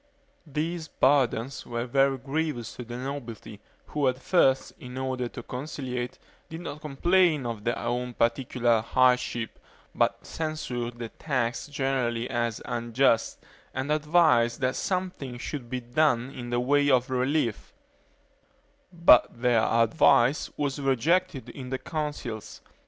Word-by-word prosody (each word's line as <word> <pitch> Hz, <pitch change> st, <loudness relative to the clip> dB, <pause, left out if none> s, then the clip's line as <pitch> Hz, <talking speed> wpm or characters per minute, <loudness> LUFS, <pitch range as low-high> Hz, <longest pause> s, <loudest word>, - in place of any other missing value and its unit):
These 160 Hz, +3 st, -3 dB
burdens 135 Hz, -2 st, +1 dB
were 120 Hz, 0 st, -3 dB
very 135 Hz, +2 st, +2 dB
grievous 135 Hz, -3 st, -3 dB
to 125 Hz, -, -6 dB
the 120 Hz, +1 st, -7 dB
nobility, 125 Hz, -6 st, -6 dB, 0.3 s
who 145 Hz, -2 st, 0 dB
at 130 Hz, 0 st, +1 dB
first, 135 Hz, -4 st, +2 dB
in 125 Hz, 0 st, -9 dB
order 130 Hz, -2 st, -2 dB
to 125 Hz, -, -8 dB
conciliate, 125 Hz, -2 st, -5 dB, 0.3 s
did 160 Hz, +1 st, -7 dB
not 150 Hz, -3 st, -7 dB
complain 155 Hz, 0 st, +2 dB
of 115 Hz, -3 st, -4 dB
their 120 Hz, -, 0 dB
own 120 Hz, +1 st, -3 dB
particular 120 Hz, -1 st, +1 dB
hardships, 125 Hz, -1 st, +1 dB, 0.3 s
but -, -, 0 dB
censured 125 Hz, -7 st, -4 dB
the 115 Hz, -1 st, -5 dB
tax 125 Hz, -4 st, -2 dB
generally 130 Hz, -4 st, -1 dB
as 120 Hz, -2 st, -2 dB
unjust, 120 Hz, 0 st, +1 dB, 0.3 s
and 130 Hz, +3 st, -2 dB
advised 150 Hz, -7 st, +3 dB
that 130 Hz, 0 st, +1 dB
something 180 Hz, -9 st, -3 dB
should 125 Hz, -1 st, -6 dB
be 130 Hz, 0 st, -3 dB
done 125 Hz, 0 st, +1 dB
in 120 Hz, -3 st, -7 dB
the 120 Hz, 0 st, 0 dB
way 145 Hz, +3 st, +3 dB
of 130 Hz, 0 st, +3 dB
relief; 125 Hz, -, 0 dB, 1.2 s
but 170 Hz, -9 st, +5 dB
their 120 Hz, -2 st, +3 dB
advice 120 Hz, +4 st, +3 dB
was 145 Hz, -1 st, -2 dB
rejected 145 Hz, +4 st, +1 dB
in 130 Hz, -2 st, -8 dB
the 130 Hz, -, -1 dB
Councils. 145 Hz, -7 st, -5 dB
130 Hz, 130 wpm, -27 LUFS, 120-145 Hz, 1.2 s, but